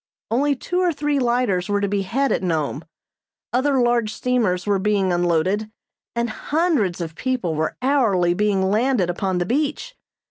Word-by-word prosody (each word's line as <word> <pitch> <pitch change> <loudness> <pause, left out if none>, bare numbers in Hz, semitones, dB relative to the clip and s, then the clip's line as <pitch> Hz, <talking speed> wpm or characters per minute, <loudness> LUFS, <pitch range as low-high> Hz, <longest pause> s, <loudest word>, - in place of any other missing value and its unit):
Only 280 +5 +2
two 355 +7 -2
or 360 -1 +2
three 295 -2 -1
lighters 235 -7 0
were 205 0 +1
to 200 - 0
be 200 0 0
had 265 +8 0
at - - +1
Nome. 160 -4 -1 0.7
Other 265 +2 +2
large 240 -3 +2
steamers 220 -8 0
were 200 -2 +1
being 195 -2 +1
unloaded, 175 +5 +1 0.5
and 235 0 0
hundreds 270 - 0
of 165 -1 -5
people 245 -5 -2
were 155 +1 -2
hourly 215 -11 +2
being 195 -1 +1
landed 220 -5 +2
upon 185 +1 -2
the 175 - 0
beach. 300 - -2
210 Hz, 165 wpm, -22 LUFS, 185-260 Hz, 0.7 s, Only